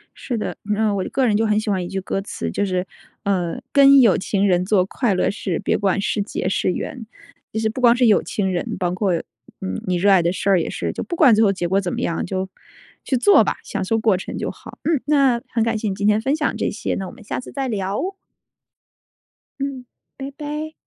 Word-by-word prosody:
是 240 Hz, -4 st, -4 dB
的， -, -, -3 dB, 0.2 s
嗯， 210 Hz, -1 st, +1 dB
我 190 Hz, -, -1 dB
个 265 Hz, -, +1 dB
人 215 Hz, -4 st, +2 dB
就 225 Hz, +1 st, +2 dB
很 210 Hz, 0 st, +2 dB
喜 215 Hz, -, -3 dB
欢 190 Hz, -3 st, 0 dB
一 -, -, -5 dB
句 195 Hz, +1 st, -3 dB
歌 195 Hz, +1 st, -2 dB
词， 200 Hz, -, -5 dB
就 205 Hz, -, 0 dB
是： 185 Hz, -1 st, -1 dB, 0.4 s
“呃， 180 Hz, -4 st, -1 dB
跟 275 Hz, -1 st, +7 dB
有 225 Hz, -6 st, +5 dB
情 200 Hz, +1 st, 0 dB
人 180 Hz, -1 st, +2 dB
做 190 Hz, -2 st, +3 dB
快 225 Hz, +1 st, 0 dB
乐 185 Hz, -, +1 dB
事， 190 Hz, -4 st, -3 dB
别 -, -, 0 dB
管 195 Hz, -1 st, +1 dB
是 205 Hz, -, -1 dB
劫 200 Hz, -2 st, -3 dB
是 185 Hz, -, +1 dB
缘。” 235 Hz, +5 st, -5 dB, 0.5 s
其 220 Hz, -, -1 dB
实 220 Hz, -, +1 dB
不 240 Hz, +4 st, -5 dB
光 240 Hz, -1 st, +6 dB
是 250 Hz, -, +3 dB
有 210 Hz, -, +5 dB
情 190 Hz, -3 st, -2 dB
人， 175 Hz, -, -3 dB
包 180 Hz, -2 st, -1 dB
括， 185 Hz, +1 st, 0 dB, 0.5 s
嗯， 95 Hz, 0 st, -4 dB
你 180 Hz, -, +1 dB
热 200 Hz, +3 st, +3 dB
爱 185 Hz, -3 st, +6 dB
的 170 Hz, -, +1 dB
事 195 Hz, +2 st, -2 dB
儿 190 Hz, -3 st, +5 dB
也 -, -, -3 dB
是， -, -, -3 dB
就 -, -, -5 dB
不 345 Hz, -, -4 dB
管 285 Hz, -8 st, +6 dB
最 220 Hz, -, +4 dB
后 200 Hz, -, +4 dB
结 180 Hz, -3 st, -2 dB
果 190 Hz, +3 st, +2 dB
怎 180 Hz, -2 st, -3 dB
么 -, -, -3 dB
样， 165 Hz, -, -1 dB
就， 190 Hz, +1 st, -3 dB, 0.5 s
去 260 Hz, -, 0 dB
做 400 Hz, +12 st, +6 dB
吧， -, -, -2 dB
享 -, -, -3 dB
受 225 Hz, +4 st, 0 dB
过 215 Hz, -4 st, +2 dB
程 190 Hz, -, -6 dB
就 -, -, -3 dB
好。 -, -, -13 dB
嗯， 315 Hz, -5 st, +1 dB
那 275 Hz, -5 st, +3 dB
很 230 Hz, -, +2 dB
感 225 Hz, 0 st, 0 dB
谢 215 Hz, 0 st, -3 dB
你 190 Hz, -, -2 dB
今 200 Hz, -, -2 dB
天 210 Hz, 0 st, +4 dB
分 275 Hz, +5 st, +1 dB
享 300 Hz, -2 st, -1 dB
这 -, -, 0 dB
些， 210 Hz, -, -3 dB
那 190 Hz, -, -4 dB
我 -, -, -8 dB
们 230 Hz, -2 st, -15 dB
下 -, -, -4 dB
次 255 Hz, -, -9 dB
再 270 Hz, -1 st, -3 dB
聊。 200 Hz, -3 st, -2 dB, 1.6 s
嗯。 270 Hz, -2 st, -4 dB, 0.3 s
拜 275 Hz, 0 st, -6 dB
拜。 300 Hz, +2 st, -5 dB
210 Hz, 265 characters per minute, -21 LUFS, 190-245 Hz, 1.6 s, 跟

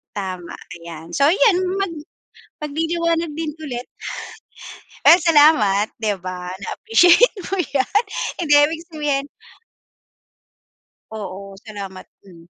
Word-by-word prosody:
tama, 185 Hz, -3 st, -5 dB, 0.2 s
ayan. 165 Hz, 0 st, -10 dB
So, 280 Hz, +1 st, +4 dB
ayan, 390 Hz, +2 st, +4 dB, 0.2 s
mag 390 Hz, -3 st, -1 dB, 0.7 s
magliliwanag 330 Hz, +2 st, -1 dB
din 320 Hz, -1 st, -3 dB
ulit. 250 Hz, -5 st, -6 dB, 1.2 s
Pero 345 Hz, -, +8 dB
salamat, 290 Hz, -, +4 dB
'di 215 Hz, -2 st, 0 dB
ba, 180 Hz, -1 st, -6 dB
na 195 Hz, +1 st, -8 dB
appreciate 355 Hz, -, +5 dB, 0.2 s
mo 390 Hz, -, -1 dB
yan. 285 Hz, -, +1 dB, 0.4 s
Hindi, 300 Hz, -4 st, +2 dB
ibig 320 Hz, +3 st, 0 dB
sabihin 290 Hz, -3 st, -1 dB, 1.9 s
Oo, 195 Hz, -2 st, -7 dB
salamat. 195 Hz, -3 st, -8 dB, 0.2 s
Hmm. 170 Hz, -3 st, -16 dB
280 Hz, 105 wpm, -20 LUFS, 195-330 Hz, 1.9 s, Pero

